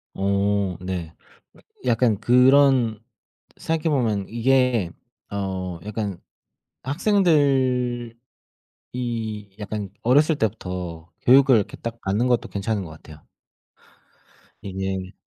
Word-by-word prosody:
오 100 -1 0
네. 90 -3 -5 0.7
약 - - +1
약간 115 -5 +3
그런 125 -2 +4 0.5
생각해 160 0 -1
보면 110 -7 0
이게 120 -4 +2 0.4
어 95 -3 -3
약간 105 -4 -4 0.6
학생들이 135 - +1 1.5
약간 105 -1 -5
어렸을 145 +6 +4
때부터 90 - -4
교육을 130 0 +6
이렇게 105 - -2
딱 115 0 -6
받는 105 +6 0
것도 120 -2 +1
괜찮은 100 0 -2
것 80 - -10
같아요. 80 -1 -15 1.4
이제 95 -1 -4
110 Hz, 195 characters per minute, -23 LUFS, 95-125 Hz, 1.5 s, 교육을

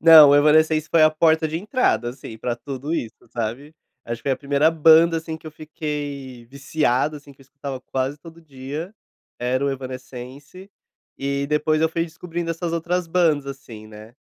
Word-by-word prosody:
Não, 160 -3 +9
o - - +6
Evanescence 155 +1 +4
foi 165 -2 +4
a 155 - +6
porta 160 0 +3
de 160 +1 -3
entrada, 210 - 0
assim, 125 -3 -10
para 120 0 -2
tudo 135 +5 -6
isso, 115 -9 -6
sabe. 120 +7 -5 0.3
Acho 115 0 -4
que 140 - -6
foi - - +3
a - - -1
primeira 145 +3 +2
banda, 165 +1 +5
assim, 160 0 -6
que 160 - -15
eu - - -6
fiquei 145 -5 -6
viciado 140 +1 0
assim, 145 -1 -14
que 135 - -25
eu - - -14
escutava 140 -1 -7
quase 135 +3 -3
todo 165 +2 -14
dia, 145 +4 -7 0.5
era 130 +2 0
o 140 - +1
Evanescence 130 +6 -9 0.5
e 140 0 -2
depois 150 +1 +1
eu 160 - +3
fui 165 +1 -1
descobrindo 170 +1 -5
essas 165 0 -3
outras 170 +1 -1
bandas, 165 -4 +2
assim, 120 -6 -9
né. 110 +2 -13
145 Hz, 185 wpm, -22 LUFS, 130-160 Hz, 0.5 s, Não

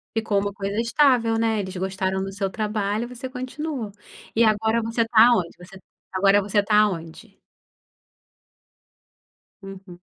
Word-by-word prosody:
Ficou 220 -2 0
uma 200 0 -3
coisa 200 +1 -3
estável, 235 -2 +2
né, 225 -1 +1
eles 190 -1 -5
gostaram 190 0 -2
do 195 - -5
seu 195 0 -2
trabalho 210 +1 -2
você 250 +1 -8
continua, 255 -2 -5 0.4
e 230 - +4
agora 220 +1 +2
você 230 +1 -1
tá 225 0 +6
aonde 185 -9 +2
você 180 +2 -14 0.3
agora 195 +2 +4
você 205 +1 +1
tá 210 +1 +1
aonde? 195 +1 -2 2.3
Uhum. 195 -2 -11
210 Hz, 135 wpm, -23 LUFS, 195-230 Hz, 2.3 s, tá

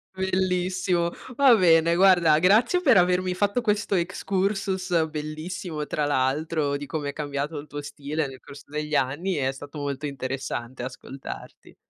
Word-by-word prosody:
Bellissimo. 185 -2 0 0.2
Va 265 -4 +6
bene, 170 -3 +4
guarda, 175 -5 +5
grazie 220 - +4
per 265 - +5
avermi 180 +1 +2
fatto 205 +5 0
questo 210 -2 0
excursus 185 -1 0
bellissimo, 155 +1 -5
tra 150 - -1
l'altro, 145 +2 0
di 145 - -7
come 145 0 -3
è - - -5
cambiato 145 +1 -3
il 150 - -10
tuo 145 +1 -6
stile 145 +1 -3
nel 130 -1 -10
corso 140 - -13
degli 150 0 -3
anni, 150 +8 0
è 135 -2 0
stato 145 +2 -10
molto 145 0 -3
interessante 130 -2 -4
ascoltarti. 130 +1 -9
160 Hz, 145 wpm, -25 LUFS, 145-185 Hz, 0.2 s, Va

